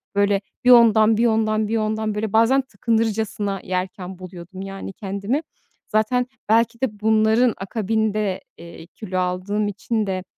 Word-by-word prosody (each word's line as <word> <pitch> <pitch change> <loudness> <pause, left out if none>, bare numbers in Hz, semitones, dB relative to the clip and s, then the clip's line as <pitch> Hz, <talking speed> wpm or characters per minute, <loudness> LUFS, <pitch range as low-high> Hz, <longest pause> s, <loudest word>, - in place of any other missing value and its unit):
böyle, 200 0 +2 0.2
bir 250 - +6
ondan, 220 -2 +6
bir 235 - +3
ondan, 220 -1 +1
bir 225 - 0
ondan, 215 0 -1
böyle, 210 -1 -3
bazen 230 +5 +4
tıkınırcasına 220 -3 -1
yerken 185 0 -4
buluyordum, 185 +1 -10
yani, 195 0 -7
kendimi. 200 - -3 0.5
Zaten 230 +4 +1 0.2
belki 230 +2 +2
de 215 -6 -2
bunların 220 +2 +3
akabinde, 215 -1 -1 0.2
eee, 170 -1 -11
kilo 185 -2 -6
aldığım 185 +4 -1
için 210 +2 -2
de, 185 -1 -2
215 Hz, 140 wpm, -22 LUFS, 195-225 Hz, 0.5 s, bir